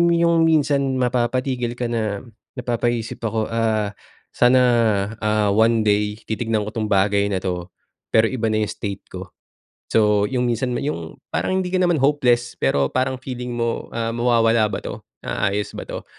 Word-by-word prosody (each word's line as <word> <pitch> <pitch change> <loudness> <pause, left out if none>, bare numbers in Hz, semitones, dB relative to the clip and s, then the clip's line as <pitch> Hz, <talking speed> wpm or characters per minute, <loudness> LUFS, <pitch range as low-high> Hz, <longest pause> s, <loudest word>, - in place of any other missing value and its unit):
yung 170 -1 +3
minsan 140 -4 +2
mapapatigil 125 0 0
ka 120 -1 -3
na, 110 -3 -2 0.3
napapaisip 120 -2 -2
ako 110 -1 -2
ah, 110 -2 0 0.4
"Sana, 125 +1 +4 0.6
ah, 105 -1 +1
one 110 +2 +3
day 105 0 +1
titignan 110 -1 -1
ko 105 - -5
tong 110 -2 -2
bagay 100 0 +2
na 95 -2 -2
'to, 90 -2 -3 0.4
pero 110 0 +3
iba 115 -4 -1
na 110 0 +1
'yong 105 - -3
state 100 -2 -5
ko." 90 0 -7 0.6
So, 105 -2 +3
yung 125 -1 0
minsan 120 +1 -1
na - - -3
yung 85 - -4 0.2
parang 185 - 0
hindi 185 -1 -2
ka 185 - +2
naman 175 -2 +3
hopeless, 125 -4 +2
pero 70 -1 +1
parang 130 0 0
feeling 125 -1 -6
mo, 115 -1 -2
ah, 115 0 -2
mawawala 115 -2 +3
ba - - -3
'to? - - -7 0.2
Naaayos 100 +1 -1
ba - - -8
'to? - - -6
115 Hz, 165 wpm, -21 LUFS, 105-125 Hz, 0.6 s, Sana